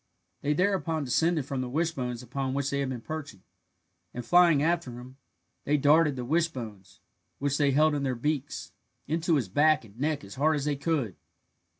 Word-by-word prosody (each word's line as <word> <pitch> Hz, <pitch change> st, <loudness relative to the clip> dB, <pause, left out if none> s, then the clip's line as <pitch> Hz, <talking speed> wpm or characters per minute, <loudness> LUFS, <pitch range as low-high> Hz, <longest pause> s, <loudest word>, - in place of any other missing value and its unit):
They 150 Hz, -, +1 dB
thereupon 180 Hz, -3 st, 0 dB
descended 155 Hz, +3 st, +1 dB
from 135 Hz, -1 st, -3 dB
the 125 Hz, -, -4 dB
wishbones 130 Hz, -5 st, -2 dB
upon 130 Hz, +2 st, -3 dB
which 140 Hz, 0 st, -1 dB
they 140 Hz, -, -1 dB
had 140 Hz, -2 st, -1 dB
been 125 Hz, -3 st, -5 dB
perching, 145 Hz, -9 st, -7 dB, 0.7 s
and 125 Hz, -1 st, -5 dB
flying 170 Hz, -1 st, +5 dB
after 160 Hz, -7 st, 0 dB
him, 125 Hz, +2 st, -11 dB, 0.5 s
they 150 Hz, +1 st, +2 dB
darted 150 Hz, +1 st, +4 dB
the 125 Hz, -1 st, -4 dB
wishbones, 120 Hz, -, -3 dB, 0.4 s
which 145 Hz, +1 st, -1 dB
they 145 Hz, -1 st, +4 dB
held 150 Hz, +3 st, +4 dB
in 145 Hz, -, -1 dB
their 130 Hz, -2 st, -1 dB
beaks, 145 Hz, +2 st, -3 dB, 0.3 s
into 165 Hz, +2 st, +1 dB
his 130 Hz, -8 st, 0 dB
back 150 Hz, +6 st, +3 dB
and 110 Hz, +2 st, -17 dB
neck 150 Hz, +1 st, -1 dB
as 100 Hz, -, -10 dB
hard 155 Hz, +4 st, +2 dB
as 145 Hz, -1 st, -2 dB
they 150 Hz, -1 st, 0 dB
could. 140 Hz, -, -1 dB
140 Hz, 185 wpm, -28 LUFS, 125-155 Hz, 0.7 s, flying